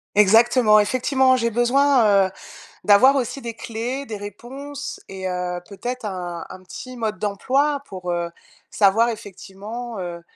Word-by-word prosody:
Exactement, 215 +2 +5
effectivement, 260 +4 +3
j'ai 235 -1 0
besoin, 240 -4 +4
heu, 190 - -4 0.5
d'avoir 255 +7 +6
aussi 265 +1 -2
des 235 -2 -6
clés, 235 +5 -4
des 220 -6 -6
réponses 270 +8 -8
et 190 -1 -6
heu, 180 -1 -3
peut-être 245 +5 -6
un 175 -4 -5
un 185 - -10
petit 255 +7 -9
mode 215 -2 -2
d'emploi 270 +8 0
pour, 185 -2 -6
heu, 170 0 -2 0.4
savoir 215 +3 +3
effectivement, 210 +2 -7
heu 175 -2 -6
220 Hz, 140 wpm, -22 LUFS, 195-255 Hz, 0.5 s, d'avoir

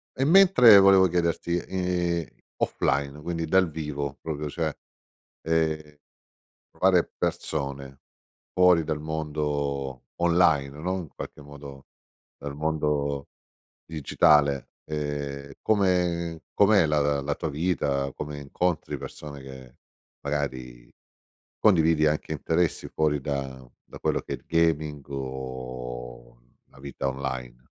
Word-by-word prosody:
e 135 - 0
mentre 165 - +8
volevo 95 -1 +6
chiederti, 85 0 0
ehm, 90 -2 -1 0.4
offline, 70 +1 0
quindi 85 +1 -3
dal 95 +2 +3
vivo 75 -2 -4
proprio, 75 -2 -4
cioè, 80 0 -2 0.7
ehm, 80 -2 -1 0.7
trovare 90 -2 +2
persone 70 -2 -3 0.5
fuori 90 -3 +5
dal 75 -1 -2
mondo 75 -4 -3
online, 85 -5 +3
no, 90 +4 -1
in 85 - -7
qualche - - -8
modo 70 -1 -11 0.5
dal 70 0 -7
mondo 75 -2 -1 0.6
digitale, 75 -3 +2
ehm, 70 -2 -4
come 90 -5 +1
com'è 100 -3 +5
la 75 0 +2
la 70 -1 +1
la 70 +1 -2
tua 80 - -3
vita, 70 -3 -1
come 75 0 -6
incontri 80 +4 -2
persone 70 -2 -9
che 65 -2 -12 0.5
magari 65 -4 -4 0.7
condividi 80 -6 +4
anche 75 +1 -1
interessi 80 +3 -1
fuori 75 -2 0
da 65 -2 -4 0.2
da - - -9
quello - - 0
che - - -6
è - - -1
il - - -20
gaming 80 -3 +1
o 65 -3 -7 0.3
la 65 - -20
vita 70 0 -4
online? 65 -2 -4
75 Hz, 115 wpm, -26 LUFS, 70-85 Hz, 0.7 s, mentre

